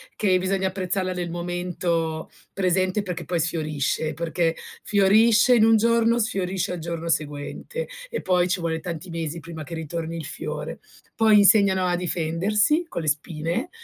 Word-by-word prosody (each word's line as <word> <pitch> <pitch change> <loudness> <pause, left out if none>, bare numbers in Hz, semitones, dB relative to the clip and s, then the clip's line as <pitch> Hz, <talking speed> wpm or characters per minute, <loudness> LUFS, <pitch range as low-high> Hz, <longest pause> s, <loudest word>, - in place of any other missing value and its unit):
che 185 -3 +2
bisogna 190 0 0
apprezzarla 185 0 -1
nel 175 -1 -4
momento 175 -2 -3 0.2
presente 185 +1 +1
perché 180 -3 -4
poi 175 -2 -2
sfiorisce, 155 -1 0
perché 165 0 -1 0.3
fiorisce 215 +4 +4
in 230 - +5
un 225 0 +6
giorno, 230 +1 +3
sfiorisce 195 -5 -1
al 175 - -5
giorno 170 0 -5
seguente 150 - -3 0.2
e 470 - -3
poi 180 -1 +2
ci 185 0 -1
vuole 160 -1 -2
tanti 170 +1 -6
mesi 165 -1 -3
prima 165 -1 -9
che 160 +4 -7
ritorni 165 +1 -5
il 160 - -5
fiore. 160 - -5 0.4
Poi 220 -2 +5
insegnano 200 -2 +5
a 175 -1 +1
difendersi 180 - +1
con 170 - -4
le - - -5
spine, 160 - -2
180 Hz, 155 wpm, -24 LUFS, 165-195 Hz, 0.4 s, un